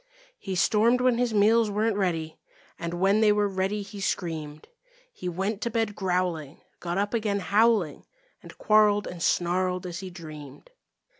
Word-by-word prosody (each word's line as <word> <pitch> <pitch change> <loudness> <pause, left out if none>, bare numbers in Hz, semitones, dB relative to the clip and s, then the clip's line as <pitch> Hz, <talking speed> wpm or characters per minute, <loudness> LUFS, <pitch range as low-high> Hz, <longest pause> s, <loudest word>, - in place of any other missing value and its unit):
He 190 -2 -5
stormed 220 +6 +3
when 250 -2 +2
his 245 -1 +1
meals 220 +1 +4
weren't 210 +1 0
ready, 165 -5 -2 0.4
And 170 +1 -4
when 195 +4 +2
they 215 -1 +5
were 205 0 +2
ready, 195 +2 -2
he 200 0 -9
screamed. 155 -5 -4 0.5
He 180 - -5
went 195 +4 -3
to 235 - -1
bed 225 -2 -1
growling, 180 -6 -2 0.2
got 175 +1 -3
up 205 +2 -1
again 215 -3 0
howling 205 -4 +1 0.3
And - - -14
quarreled 210 -1 +3
and 175 -1 -7
snarled 180 +2 0
as 175 -1 -5
he 190 -1 -7
dreamed. 155 -5 -11
195 Hz, 160 wpm, -26 LUFS, 175-210 Hz, 0.5 s, they